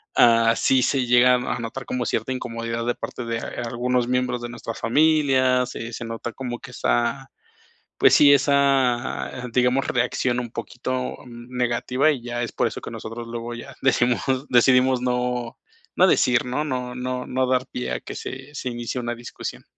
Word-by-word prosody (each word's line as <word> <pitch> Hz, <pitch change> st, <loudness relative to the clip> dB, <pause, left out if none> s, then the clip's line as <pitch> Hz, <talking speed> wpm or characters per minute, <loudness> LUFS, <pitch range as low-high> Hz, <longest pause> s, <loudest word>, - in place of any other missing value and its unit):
Ah, 115 Hz, -1 st, +5 dB
sí 130 Hz, -1 st, +3 dB
se 135 Hz, -1 st, +1 dB
llega 125 Hz, +1 st, +5 dB
a 125 Hz, 0 st, -2 dB
a 120 Hz, -, -6 dB
notar 120 Hz, +3 st, -6 dB
como 125 Hz, -1 st, -2 dB
cierta 115 Hz, +3 st, -1 dB
incomodidad 115 Hz, -2 st, -4 dB
de 120 Hz, -, 0 dB
parte 125 Hz, -, -6 dB
de 115 Hz, 0 st, -2 dB
a 120 Hz, -, -5 dB
algunos 120 Hz, +1 st, 0 dB
miembros 125 Hz, -1 st, 0 dB
de 120 Hz, -, -5 dB
nuestras 115 Hz, -1 st, -7 dB
familias, 130 Hz, -2 st, +3 dB
eh, 115 Hz, 0 st, -6 dB
se 120 Hz, -, -5 dB
nota 115 Hz, +1 st, -5 dB
como 120 Hz, -2 st, -5 dB
que 130 Hz, -, -11 dB
esa, 125 Hz, +3 st, -1 dB, 0.7 s
pues -, -, +6 dB
sí, 145 Hz, -1 st, +7 dB
esa, 135 Hz, -3 st, +2 dB, 0.2 s
digamos, 125 Hz, +2 st, +2 dB
reacción 125 Hz, 0 st, 0 dB
un 120 Hz, -, -6 dB
poquito, 125 Hz, +2 st, -4 dB
mm, 120 Hz, +1 st, -11 dB
negativa, 125 Hz, +4 st, +1 dB
y 140 Hz, -5 st, -2 dB
ya 120 Hz, 0 st, -3 dB
es 120 Hz, -, -3 dB
por -, -, +1 dB
eso -, -, -4 dB
que -, -, -8 dB
nosotros 115 Hz, +1 st, -7 dB
luego 120 Hz, 0 st, -5 dB
ya 135 Hz, +3 st, -9 dB
decimos 125 Hz, -2 st, +2 dB, 0.3 s
decidimos 125 Hz, +1 st, +4 dB
no 125 Hz, -1 st, -1 dB, 0.4 s
no -, -, +5 dB
decir, 125 Hz, 0 st, +3 dB
¿no? 130 Hz, +5 st, -1 dB
No 125 Hz, -4 st, -3 dB
no 125 Hz, 0 st, -4 dB
no 130 Hz, 0 st, 0 dB
dar 130 Hz, 0 st, +1 dB
pie 60 Hz, 0 st, -4 dB
a -, -, -3 dB
que -, -, -8 dB
se 130 Hz, +3 st, -8 dB
se 130 Hz, -2 st, -4 dB
inicie 120 Hz, +1 st, -4 dB
una 120 Hz, 0 st, -3 dB
discusión. 120 Hz, 0 st, -8 dB
125 Hz, 185 wpm, -23 LUFS, 120-130 Hz, 0.7 s, sí